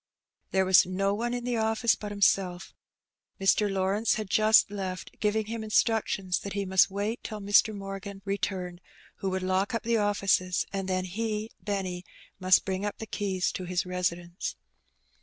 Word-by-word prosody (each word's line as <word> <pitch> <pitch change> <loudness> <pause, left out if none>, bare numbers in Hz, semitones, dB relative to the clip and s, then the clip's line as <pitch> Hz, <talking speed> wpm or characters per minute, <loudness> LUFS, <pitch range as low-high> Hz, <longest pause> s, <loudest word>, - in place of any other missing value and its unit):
There 190 0 +2
was 185 0 +7
no 195 +2 0
one 235 +3 -2
in 245 0 -3
the 245 -1 -1
office 225 +1 +2
but 210 - -6
himself. 190 -2 +1 0.7
Mr. 200 +1 +3
Lawrence 195 +3 +1
had 215 -3 -5
just 215 -1 +5
left, 190 -2 -6
giving 215 +1 +1
him 225 +1 -5
instructions 215 -4 +1
that 200 - -6
he 200 -1 -2
must 190 +1 +4
wait 205 +4 -3
till 215 - -5
Mr. 205 +2 +4
Morgan 195 -1 -7
returned, 185 -3 -3 0.4
who 195 - -2
would 185 0 -2
lock 190 +4 0
up 230 - -2
the 235 0 +1
offices, 195 -3 +1
and 195 -1 -3
then 185 0 0
he 215 +3 -3
(Benny) 190 -3 -3 0.4
must 185 -1 +4
bring 190 0 -2
up 205 -1 -3
the 220 - -6
keys 195 -3 -1
to 185 - -5
his 180 0 -1
residence. 175 -1 -3
195 Hz, 170 wpm, -28 LUFS, 185-215 Hz, 0.7 s, was